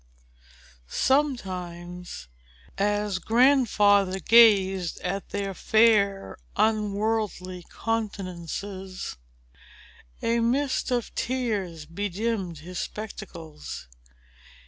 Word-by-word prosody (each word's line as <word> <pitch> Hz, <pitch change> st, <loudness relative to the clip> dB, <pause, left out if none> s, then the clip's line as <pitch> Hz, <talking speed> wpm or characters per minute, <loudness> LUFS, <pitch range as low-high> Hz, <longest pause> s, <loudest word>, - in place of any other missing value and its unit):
Sometimes, 180 Hz, -, -1 dB, 0.5 s
as 205 Hz, -1 st, 0 dB
Grandfather 210 Hz, -5 st, +4 dB
gazed 195 Hz, -4 st, +5 dB
at 195 Hz, +2 st, -3 dB
their 200 Hz, -1 st, -3 dB
fair, 200 Hz, -, +3 dB, 0.2 s
unworldly 210 Hz, -4 st, 0 dB
countenances, 195 Hz, -, -4 dB, 1.1 s
a 235 Hz, +1 st, +2 dB
mist 260 Hz, +4 st, +1 dB
of 245 Hz, -2 st, -1 dB
tears 205 Hz, -11 st, -2 dB
bedimmed 195 Hz, +1 st, -2 dB
his 180 Hz, +2 st, -6 dB
spectacles. 170 Hz, -, -7 dB
200 Hz, 65 wpm, -26 LUFS, 180-225 Hz, 1.1 s, gazed